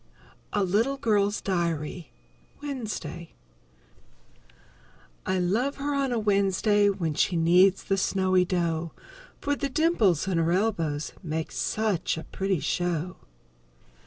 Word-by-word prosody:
A 205 - +1
LITTLE 225 +9 +1
GIRL'S 205 -4 +1
DIARY 170 -3 -2 0.5
Wednesday 225 - -6 1.9
_I 185 0 +1
love 225 +11 0
her 285 +1 -2
on 275 -2 0
a 240 - 0
Wednesday 205 0 +2
When 175 -6 -1
she 175 - +1
kneads 180 +3 +4
the 195 - 0
snowy 185 -1 +2
dough, 170 -2 -1 0.5
For 285 0 0
the 280 -1 -2
dimples 250 - +2
in 180 -3 +1
her 165 +1 +1
elbows 165 -7 -1
Make 160 -3 -3
such 210 -7 -1
a 160 - -5
pretty 190 -4 -2
show. 175 0 -2
190 Hz, 120 wpm, -27 LUFS, 170-215 Hz, 1.9 s, kneads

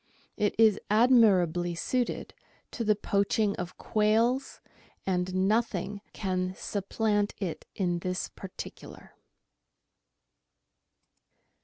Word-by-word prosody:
It 210 -1 0
is 220 -2 +5
admirably 195 -7 +4
suited 245 +8 -2 0.4
to 235 - -3
the 215 -1 +3
poaching 200 +1 +1
of 175 0 -6
quails, 225 +5 +1 0.5
and 185 0 0
nothing 205 -2 0
can 185 -2 -2
supplant 205 +1 -1
it 180 -6 -5
in 175 -3 0
this 185 +1 -2
particular. 190 -1 -10
200 Hz, 90 wpm, -29 LUFS, 185-220 Hz, 0.5 s, is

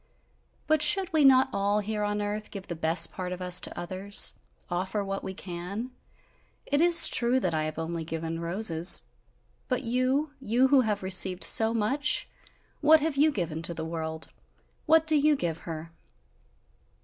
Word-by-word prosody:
"But 310 -1 +1
should 330 +4 +6
we 310 -2 +3
not 265 -1 +5
all, 200 +1 -1
here 210 0 -4
on 205 0 -2
earth, 210 +1 -5
give 195 -2 -9
the 170 - -7
best 165 +1 +1
part 180 -1 -6
of 180 - -6
us 180 -1 +1
to - - -1
others? 190 +3 +2 0.3
Offer 190 +4 -3
what 195 0 -5
we 190 - -7
can! 185 +8 -7 0.7
It 285 +1 0
is 345 0 +6
true, 245 +2 0
that 180 -8 -2
I 155 -1 -2
have 155 0 -6
only 165 0 -5
given 165 0 -6
roses 170 -1 +2 0.6
but 255 - -3
you? 255 +5 -1
You 255 +1 +1
who 275 -1 +4
have 210 -4 -3
received 185 -1 +1
so 220 0 +4
much, 245 +7 -1 0.5
what 310 +1 +4
have 310 -1 -2
you 300 +3 +2
given 170 - -5
to 170 +1 -2
the 160 - -6
world? 160 -1 -5 0.6
What 320 0 +4
do 315 -1 +5
you 300 +1 +2
give 170 - -4
her?" 165 0 -8
205 Hz, 175 wpm, -26 LUFS, 170-265 Hz, 0.7 s, should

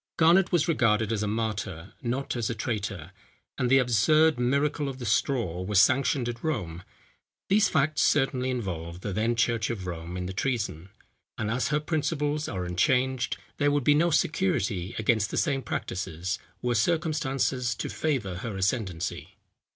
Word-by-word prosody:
Garnet 170 +3 +5
was 175 -3 +2
regarded 115 -8 +2
as 105 - -1
a 105 - -1
martyr, 105 -5 -3
not 130 +2 -2
as 120 -3 -1
a 115 - -2
traitor; 105 -6 -4 0.5
and 125 -2 +1
the 135 - +6
absurd 135 +5 +4
miracle 140 +3 +1
of 130 - -7
the 125 - -6
Straw, 110 - 0
was 95 +1 +2
sanctioned 130 +2 +3
at 120 -1 -5
Rome. 90 - -2 0.7
These 210 +2 +4
facts 155 -1 +1
certainly 135 -2 +2
involve 90 -8 -4
the 100 - -4
then 115 +4 +1
church 115 -1 +1
of 105 -6 -4
Rome 85 0 -5
in 90 - -3
the 95 - -5
treason; 100 - -2 0.5
and 110 -1 -2
as 125 +2 0
her 150 +1 +1
principles 150 -1 -1
are 95 -3 -3
unchanged, 125 +8 +1 0.2
there 145 - +3
would 145 -1 +1
be 145 - +5
no 165 +4 +3
security 150 - 0
against 110 -2 +1
the - - -4
same 140 -4 +1
practices, 95 -4 -3 0.2
were 125 0 +1
circumstances 135 -3 0
to - - -4
favour 125 - -2
her 100 +1 -5
ascendency. 95 -4 -2
120 Hz, 165 wpm, -27 LUFS, 100-140 Hz, 0.7 s, the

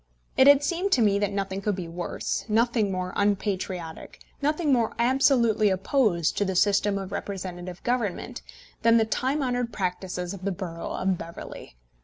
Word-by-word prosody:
It 265 - +6
had 285 0 +7
seemed 360 +5 -1
to 250 - +4
me 200 -1 +3
that 205 -1 0
nothing 195 -1 -3
could 205 0 0
be 180 -3 -5
worse, 170 +1 -3
nothing 225 -1 +2
more 185 -1 -3
unpatriotic, 190 -4 -2 0.2
nothing 300 0 +1
more 235 -3 +1
absolutely 235 -3 +3
opposed 190 - +1
to - - +3
the 190 -1 -2
system 200 +1 +3
of 195 -1 -6
representative 185 -3 -6
government, 230 - -2 0.4
than 230 0 +5
the 225 - +3
time 265 +6 -1
honoured 245 -2 -1
practices 180 -2 -3
of 195 - -9
the 200 - 0
borough 170 -2 -5
of 190 -1 -1
Beverley. 165 - -9
200 Hz, 165 wpm, -26 LUFS, 185-240 Hz, 0.4 s, had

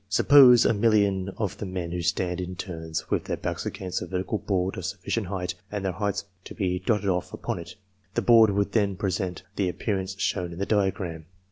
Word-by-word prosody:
Suppose 125 +4 +7
a - - +4
million 100 -3 +2
of 100 -2 -3
the - - -3
men 90 -2 -4
to 90 0 -2
stand 90 +1 -1
in 90 0 -5
turns, 80 -2 -5
with - - 0
their - - -2
backs - - -3
against 95 -2 -4
a - - -5
vertical 95 +3 -2
board 95 -1 -1
of 95 - -5
sufficient 95 +3 -3
height, 90 -1 -3 0.2
and 105 -2 -3
their 95 - +1
heights 100 +2 -2 0.2
to - - -9
be 90 -4 -1
dotted 100 +1 0
off 90 -2 0
upon - - -3
it. 85 - -9 0.4
The - - +1
board 115 -2 +7
would 100 0 0
then 100 -3 +1
present 90 -2 -2
the 95 -3 +1
appearance 95 0 -3
shown 90 -4 -1
in - - -9
the 100 - -1
diagram. 95 -6 -1
95 Hz, 210 wpm, -26 LUFS, 90-100 Hz, 0.4 s, Suppose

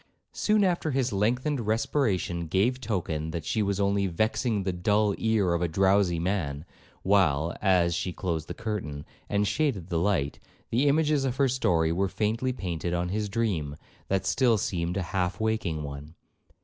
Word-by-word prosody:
Soon 210 -1 +2
after 175 -4 +1
his 130 -4 0
lengthened 125 +8 +1
respiration 110 - 0
gave 115 +10 +1
token 80 -8 -2
that 80 -1 -5
she 110 - 0
was 100 -1 0
only 100 0 +2
'vexing 110 +3 0
the 95 -1 -1
dull 105 +3 +2
ear 110 -6 +2
of 85 - 0
a 90 - +2
drowsy 95 +1 +2
man;' 80 -5 -2 0.4
while, 85 -5 +2
as 90 -4 +3
she 90 +2 -2
closed 85 -4 -3
the - - -6
curtain, 75 -10 -4 0.2
and 100 0 +1
shaded 105 - -1
the 85 - 0
light, 85 -6 0 0.3
the 130 +5 +2
images 150 -1 +3
of 130 -2 -1
her 135 0 +3
story 85 -11 +1
were 95 +3 0
faintly 110 +6 -1
painted 90 -6 -3
on 90 0 -1
his 105 +2 -2
dream, 95 -10 -1 0.3
that 95 -1 0
still 115 +5 +3
seemed 90 -2 -2
half 90 -1 -2
a - - -2
waking 100 -9 -1
one. 70 +2 -8
100 Hz, 170 wpm, -27 LUFS, 85-110 Hz, 0.4 s, as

